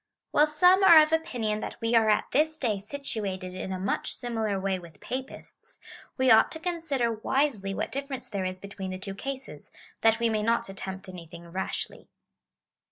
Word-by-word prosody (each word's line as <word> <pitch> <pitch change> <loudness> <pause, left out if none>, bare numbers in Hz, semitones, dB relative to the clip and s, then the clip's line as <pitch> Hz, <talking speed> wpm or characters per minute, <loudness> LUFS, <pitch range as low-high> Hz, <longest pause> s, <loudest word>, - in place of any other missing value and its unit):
While 300 +1 +5
some 360 +6 +5
are 335 -4 +10
of 305 - -2
oj)inion 230 -10 -1
that - - -6
we 230 +1 -1
are 225 -2 +5
at 210 - +3
this 310 +3 +2
day 225 -9 0
situated 200 -6 -4
in 185 +1 -5
a 185 - -2
much 190 +2 -2
similar 225 -5 -2
way 190 -1 -1
with 170 -3 -14
Papists,^ 260 +1 -7 0.4
we 260 -1 +4
ought 220 - +6
to 320 - -5
consider 320 -8 -1
wisely 220 -4 0
what - - -3
difference 275 -1 -4
there 200 -2 -3
is 185 0 -3
between 200 -1 -7
the 185 - -4
two 195 +1 -6
cases, 270 +6 -7 0.3
that 225 0 +4
we 235 - +2
may 220 -1 0
not 230 +2 +1
attempt 190 0 -6
anything 170 -2 -10
rashly. 190 +2 -4
225 Hz, 180 wpm, -28 LUFS, 195-275 Hz, 0.4 s, are